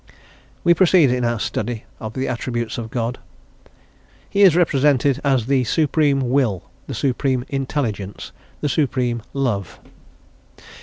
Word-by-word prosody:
We 170 - +6
proceed 175 -6 +4
in 125 0 0
our 120 -1 0
study 110 +1 -3 0.2
of 110 0 -6
the 130 0 -2
attributes 120 -1 -3
of 110 -1 -6
God. 120 +1 -3 1.1
He 200 - 0
is 190 -5 +7
represented 145 -4 +2
as 135 -5 +2
the 135 0 +2
Supreme 140 -2 +1
Will, 120 -10 +1 0.2
the - - -5
Supreme 130 -1 0
Intelligence, 125 -8 -3 0.3
the 145 - 0
Supreme 125 -4 0
Love. 115 -10 -2
130 Hz, 125 wpm, -21 LUFS, 120-145 Hz, 1.1 s, is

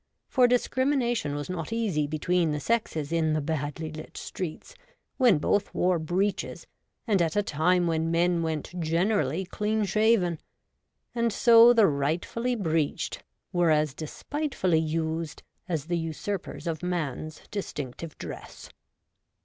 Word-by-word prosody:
For 250 -2 +4
discrimina 250 0 +1
tion 145 -9 -2
was 145 0 -4
not 180 +1 -4
easy 200 -11 0
between 165 +2 +1
the 150 - -2
sexes 160 -7 -1
in 160 -2 +2
the 155 - +1
badly 155 +1 -3
lit 155 0 -9
streets, 175 -4 -6 0.4
when 245 - +5
both 200 +7 +1
wore 180 -1 +2
breeches, 185 +5 -1 0.4
and 205 -6 +2
at 165 -2 0
a 205 - +3
time 175 +2 +2
when 165 -1 0
men 170 +1 +2
went 160 0 -3
generally 170 0 +1
clean 210 +3 -1
shaven; 200 -4 +2 0.7
and 235 -1 +1
so 230 +2 +7
the 230 -3 +6
rightfully 165 - 0
breeched 160 -8 -1 0.3
were 175 -1 +3
as 150 -2 +2
despltefully 185 - -1
used 160 0 -2 0.3
as 160 -5 -1
the 175 0 -1
usurpers 165 +4 -4
of 160 -2 -2
man's 155 -4 -3
distinctive 155 -5 -5
dress. - - -9
170 Hz, 135 wpm, -27 LUFS, 155-205 Hz, 0.7 s, so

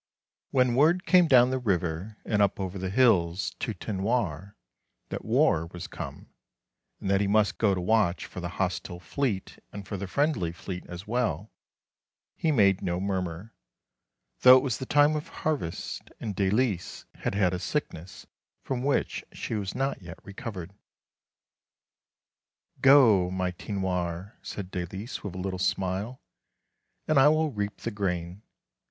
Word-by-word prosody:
When 125 -2 +3
word 160 +8 +3
came 180 -2 +5
down 125 -3 +6
the 130 - 0
river, 95 -1 -2
and 105 -2 +1
up 100 -1 +2
over 95 0 -4
the 95 0 -3
hills 95 -6 +2
to 115 -5 -3
Tinoir 100 -2 -2 0.5
that - - -5
war 80 +1 +2
was 90 0 -8
come - - -8 0.7
and - - -5
that 100 0 +3
he 100 - +1
must 100 -4 +2
go 100 -4 +3
to 90 - -2
watch 95 -2 +2
for - - -8
the 85 -1 -4
hostile 90 -2 -2
fleet 105 0 -3
and 100 -1 -8
for 100 - -4
the 100 +1 -5
friendly 125 - 0
fleet 90 +1 -7
as 90 +2 -8
well, 115 -2 -1 0.8
he 160 - +1
made 100 -8 +4
no 90 0 -1
murmur, 95 +1 -3 0.9
though 130 0 +9
it - - +1
was 130 -6 -1
the 130 - -5
time 145 +1 +4
of 150 - -4
harvest, 145 - -4
and 105 -3 -4
Dalice 100 -1 0
had - - -2
had 95 -3 +2
a 90 - -2
sickness 90 - -4 0.4
from 130 -2 -2
which 140 +2 0
she - - -5
was 100 -3 -3
not 135 -4 -1
yet 85 -2 -9
recovered. 95 -3 -7 1.5
" - - -37
Go, 120 -10 +6
my 90 0 -1
Tinoir," 90 -1 -3
said 95 -2 -7
Dalice, 95 +6 -5
with 100 -4 -6
a - - -5
little 95 0 -3
smile, 95 +6 -1 0.4
" - - -51
and 155 -3 +4
I 135 - +7
will 155 0 +2
reap 105 -2 -4
the 115 - -3
grain. 90 -2 -3
100 Hz, 160 wpm, -27 LUFS, 90-125 Hz, 1.5 s, though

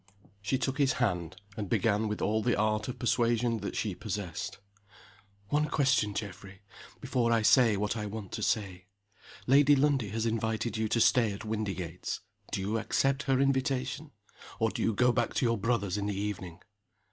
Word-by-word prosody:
SHE 110 +6 0
took 135 +2 -2
his 135 -2 +3
hand, 90 -8 -1 0.2
and 105 -4 -4
began 110 +1 +1
with 105 0 -3
all 110 +1 +1
the 120 +2 +1
art 110 0 0
of 125 - -5
persuasion 120 -1 +1
that - - -5
she 105 -4 -1
possessed. 95 -3 -5 0.9
"One 150 +3 +2
question, 130 -9 +1
Geoffrey, 100 -1 -7 0.4
before 120 -2 0
I 115 -2 +3
say 115 -3 +5
what 105 +2 -1
I 105 -2 -3
want 105 -2 -7
to - - -5
say. 95 -4 -1 0.6
Lady 145 +2 +6
Lundie 135 -6 +2
has 110 +2 -2
invited 110 +1 -1
you 110 0 0
to 115 - +1
stay 115 -1 +4
at 100 +3 -8
Windygates. 95 -6 -4 0.3
Do - - -2
you 105 +4 -1
accept 135 +4 +1
her 130 -1 +3
invitation? 135 +1 0 0.5
or 110 -1 +1
do - - -4
you 115 - +1
go 125 +3 +4
back 120 -1 -1
to - - +1
your 115 -2 +1
brother's 105 -3 0
in 100 - -2
the 100 -1 -2
evening?" 95 -4 -5
110 Hz, 180 wpm, -30 LUFS, 100-125 Hz, 0.9 s, Lady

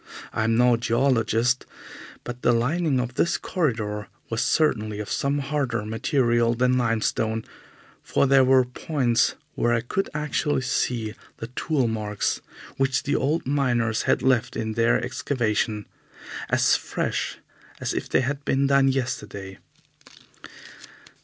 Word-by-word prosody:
I 110 - 0
am 115 0 +2
no 125 -1 +5
geologist, 120 0 +1 0.6
but 120 0 -7
the 120 - +3
lining 140 +4 +1
of 125 0 -3
this 170 +6 +1
corridor 110 - -2 0.2
was 115 0 0
certainly 110 -9 +1
of 105 - -5
some 140 +1 0
harder 135 -6 -1
material 120 +1 +1
than 125 +1 +2
limestone, 110 -2 0 0.6
for - - +1
there 135 -1 +5
were 130 0 +5
points 125 -2 0 0.2
where 120 - +1
I 115 - 0
could 190 +12 -2
actually 150 -2 0
see 120 -3 -1 0.2
the 115 - -7
tool 145 -6 +1
marks 105 -2 -2 0.4
which 135 0 +1
the 145 - 0
old 155 +4 0
miners 120 -5 +1
had - - +2
left 130 -3 +2
in 110 0 -2
their 115 +1 +3
excavation, 115 -4 -1 0.6
as - - +4
fresh - - -2 0.4
as - - -2
if - - -4
they - - +3
had 140 +2 -2
been 140 -1 +1
done 140 0 +4
yesterday. 105 -7 -3
125 Hz, 135 wpm, -24 LUFS, 115-135 Hz, 0.6 s, no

